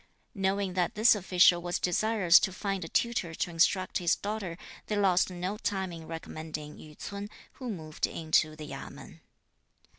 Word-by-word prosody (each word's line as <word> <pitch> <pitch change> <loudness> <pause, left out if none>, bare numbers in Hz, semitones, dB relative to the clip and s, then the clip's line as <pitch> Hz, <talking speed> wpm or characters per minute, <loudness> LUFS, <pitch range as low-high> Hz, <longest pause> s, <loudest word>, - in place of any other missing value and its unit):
Knowing 195 -2 0
that 180 -2 0
this 220 +3 +6
official 180 -3 +4
was 175 0 -1
desirous 190 -1 +4
to 190 - -1
find 195 0 -3
a 165 - -7
tutor 205 -9 0
to 175 - -2
instruct 185 +3 +2
his 175 -1 +2
daughter, 200 -5 -4 0.3
they 210 - -1
lost 190 -3 +3
no 185 +3 -4
time 190 -2 -2
in 165 -1 -9
recommending 155 -2 -7
Yü 150 -1 -13
ts'un, 200 0 -6 0.3
who 255 -2 -5
moved 160 -7 -3
into 155 -1 +1
the 155 -1 -8
Yamên. 135 -1 -9
180 Hz, 160 wpm, -29 LUFS, 165-200 Hz, 0.3 s, this